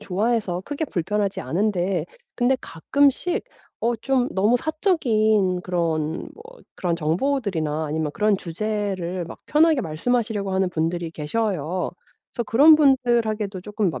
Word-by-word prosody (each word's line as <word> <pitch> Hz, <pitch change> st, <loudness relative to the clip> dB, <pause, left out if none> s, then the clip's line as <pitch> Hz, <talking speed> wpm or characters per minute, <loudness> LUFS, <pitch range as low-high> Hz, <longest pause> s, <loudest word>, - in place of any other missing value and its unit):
좋아해서 205 Hz, -2 st, -1 dB
크게 290 Hz, +2 st, -3 dB
불편하지 200 Hz, -, -1 dB
않은데 185 Hz, +5 st, 0 dB, 0.3 s
근데 255 Hz, +2 st, +2 dB
가끔씩 280 Hz, -, +1 dB, 0.4 s
어 235 Hz, +1 st, +1 dB
좀 255 Hz, +2 st, 0 dB
너무 210 Hz, +6 st, +3 dB
사적인 220 Hz, -, +1 dB
그런 165 Hz, -3 st, -2 dB
뭐 450 Hz, -, -13 dB, 0.3 s
그런 170 Hz, -2 st, -1 dB
정보들이나 165 Hz, -, -1 dB
아니면 155 Hz, 0 st, -2 dB
그런 210 Hz, -2 st, +2 dB
주제를 185 Hz, -1 st, -3 dB
막 -, -, -10 dB
편하게 310 Hz, -2 st, +3 dB
말씀하시려고 210 Hz, +4 st, -1 dB
하는 190 Hz, -1 st, +1 dB
분들이 165 Hz, 0 st, -2 dB
계셔요. 175 Hz, 0 st, -2 dB, 0.4 s
그래서 235 Hz, -, -2 dB
그런 285 Hz, +9 st, +7 dB
분들에게도 235 Hz, -8 st, +2 dB
쪼끔 210 Hz, 0 st, -1 dB
막 130 Hz, -, -6 dB
205 Hz, 315 characters per minute, -23 LUFS, 175-240 Hz, 0.4 s, 그런